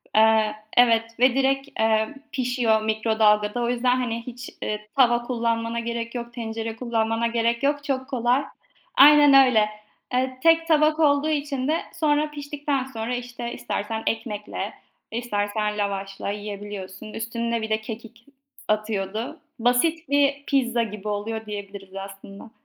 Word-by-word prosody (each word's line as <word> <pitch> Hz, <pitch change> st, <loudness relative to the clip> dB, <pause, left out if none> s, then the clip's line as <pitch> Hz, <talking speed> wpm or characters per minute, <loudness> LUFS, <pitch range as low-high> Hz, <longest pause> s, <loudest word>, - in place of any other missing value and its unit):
Eee, 220 Hz, -1 st, +4 dB, 0.2 s
evet, 230 Hz, -1 st, +4 dB
ve 255 Hz, 0 st, +5 dB
direkt, 270 Hz, +1 st, +1 dB
eee, 220 Hz, 0 st, +2 dB, 0.2 s
pişiyor 245 Hz, -4 st, +1 dB
mikrodalgada. 220 Hz, 0 st, +2 dB
O 235 Hz, -, 0 dB
yüzden 245 Hz, +1 st, +2 dB
hani 235 Hz, -2 st, -2 dB
hiç, 250 Hz, +1 st, -7 dB
eee, 210 Hz, 0 st, -4 dB
tava 240 Hz, -2 st, +4 dB
kullanmana 230 Hz, -1 st, -1 dB
gerek 235 Hz, +1 st, -4 dB
yok, 235 Hz, 0 st, -5 dB
tencere 225 Hz, -1 st, -4 dB
kullanmana 225 Hz, -1 st, 0 dB
gerek 235 Hz, +2 st, 0 dB
yok, 285 Hz, 0 st, +1 dB
çok 265 Hz, -2 st, -2 dB
kolay. 250 Hz, +1 st, +1 dB, 0.5 s
Aynen 290 Hz, 0 st, +8 dB
öyle. 215 Hz, -4 st, +3 dB, 0.4 s
Eee, 255 Hz, 0 st, 0 dB
tek 330 Hz, 0 st, +5 dB
tabak 305 Hz, 0 st, +3 dB
olduğu 290 Hz, 0 st, +3 dB
için 285 Hz, -3 st, -1 dB
de 320 Hz, +2 st, +1 dB
sonra 300 Hz, -1 st, +1 dB
piştikten 285 Hz, -1 st, -2 dB
sonra, 245 Hz, -2 st, -4 dB
işte, 245 Hz, -1 st, -6 dB
istersen 225 Hz, -1 st, -3 dB
ekmekle 215 Hz, -2 st, -3 dB, 0.4 s
istersen 210 Hz, -2 st, -1 dB
lavaşla 195 Hz, -1 st, -3 dB
yiyebiliyorsun. 205 Hz, -1 st, -7 dB
Üstüne 230 Hz, 0 st, -2 dB
bir 220 Hz, -, -4 dB
de 220 Hz, 0 st, 0 dB
kekik 230 Hz, +1 st, -9 dB, 0.3 s
s -, -, -17 dB
atıyordu. 215 Hz, +1 st, -3 dB, 0.2 s
Basit 280 Hz, +7 st, +2 dB
bir 285 Hz, 0 st, +2 dB
pizza 245 Hz, -4 st, +2 dB
gibi 210 Hz, -1 st, -7 dB
oluyor 220 Hz, +2 st, -3 dB
diyebiliriz 200 Hz, -2 st, -8 dB
aslında. 195 Hz, +2 st, -9 dB
235 Hz, 140 wpm, -24 LUFS, 220-260 Hz, 0.5 s, Aynen